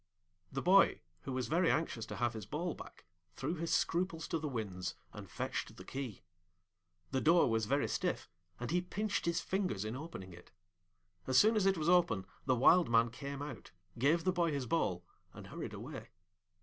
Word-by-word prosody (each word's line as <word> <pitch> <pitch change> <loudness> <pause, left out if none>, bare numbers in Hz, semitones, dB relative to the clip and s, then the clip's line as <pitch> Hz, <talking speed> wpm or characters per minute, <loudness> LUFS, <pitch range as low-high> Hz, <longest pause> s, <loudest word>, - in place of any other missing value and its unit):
The 135 - -3
boy, 195 +3 +5 0.2
who 135 - -3
was 130 -1 -2
very 170 +2 +3
anxious 135 -8 0
to - - -6
have 120 -1 0
his 110 -3 -7
ball 165 +7 -2
back, - - -12 0.3
threw 145 +5 -2
his 165 -1 -3
scruples 165 0 0
to 165 - 0
the 155 - -3
winds, 100 -8 -4 0.2
and - - -9
fetched - - -4
the - - -9
key. 130 -9 -6 0.9
The 130 - +1
door 165 0 +5
was 110 -1 +1
very 140 +4 +2
stiff, 180 -1 -1 0.3
and 120 +4 -3
he 175 +1 +2
pinched 205 +2 -2
his 170 0 +1
fingers 185 - -1
in 110 +3 -3
opening 135 - -7
it. 90 +1 -14 0.8
As 130 -1 +3
soon 220 +2 +6
as 200 -3 +3
it 195 -1 +3
was 155 0 -1
open 175 - +3 0.2
the 130 - +4
Wild 165 +7 +5
Man 115 0 +4
came 140 +3 -6
out, 135 -10 -8 0.3
gave 155 +6 +3
the 185 - +3
boy 170 -2 +1
his 140 -3 -2
ball, 95 - 0 0.3
and - - -9
hurried - - -6
away. - - -7
145 Hz, 190 wpm, -34 LUFS, 120-175 Hz, 0.9 s, soon